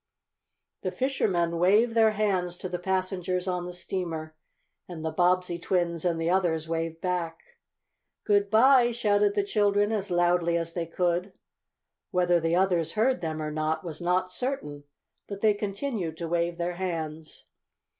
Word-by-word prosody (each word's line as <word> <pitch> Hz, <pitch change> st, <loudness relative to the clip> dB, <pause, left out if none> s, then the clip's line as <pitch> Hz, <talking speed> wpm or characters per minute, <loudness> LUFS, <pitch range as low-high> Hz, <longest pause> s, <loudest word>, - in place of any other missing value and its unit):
The -, -, -1 dB
fishermen 175 Hz, -11 st, 0 dB
waved 210 Hz, +6 st, +4 dB
their 220 Hz, -1 st, +4 dB
hands 185 Hz, -4 st, 0 dB
to 185 Hz, -, -5 dB
the 180 Hz, -1 st, -4 dB
passengers 185 Hz, 0 st, -1 dB
on 180 Hz, -1 st, -2 dB
the -, -, -5 dB
steamer, 170 Hz, -3 st, -4 dB, 0.5 s
and 160 Hz, -3 st, -7 dB
the 160 Hz, -, -1 dB
Bobbsey 180 Hz, 0 st, +1 dB
twins 170 Hz, -2 st, 0 dB
and 170 Hz, -2 st, +1 dB
the 165 Hz, -, -1 dB
others 170 Hz, -3 st, +1 dB
waved 165 Hz, 0 st, -3 dB
back. 175 Hz, -3 st, -2 dB, 0.8 s
"Good 205 Hz, -1 st, +2 dB
bye!" 245 Hz, +3 st, +6 dB
shouted 205 Hz, -3 st, +1 dB
the 205 Hz, -, +2 dB
children, 205 Hz, 0 st, +2 dB
as 205 Hz, -2 st, -2 dB
loudly 175 Hz, -1 st, +2 dB
as 165 Hz, 0 st, -3 dB
they 170 Hz, -1 st, -3 dB
could. 180 Hz, +2 st, -1 dB, 0.8 s
Whether 175 Hz, -2 st, +2 dB
the 165 Hz, +1 st, 0 dB
others 175 Hz, -3 st, +1 dB
heard 225 Hz, -1 st, +1 dB
them 155 Hz, -2 st, -3 dB
or 155 Hz, -, -3 dB
not 155 Hz, +1 st, -1 dB
was 165 Hz, -2 st, -6 dB
not 180 Hz, +1 st, 0 dB
certain, 165 Hz, -, -4 dB, 0.4 s
but 200 Hz, -1 st, -7 dB
they 215 Hz, -1 st, +4 dB
continued 205 Hz, -, -3 dB
to 170 Hz, -, -4 dB
wave 170 Hz, 0 st, -1 dB
their 175 Hz, 0 st, -3 dB
hands. 160 Hz, -4 st, -5 dB
180 Hz, 155 wpm, -27 LUFS, 165-200 Hz, 0.8 s, bye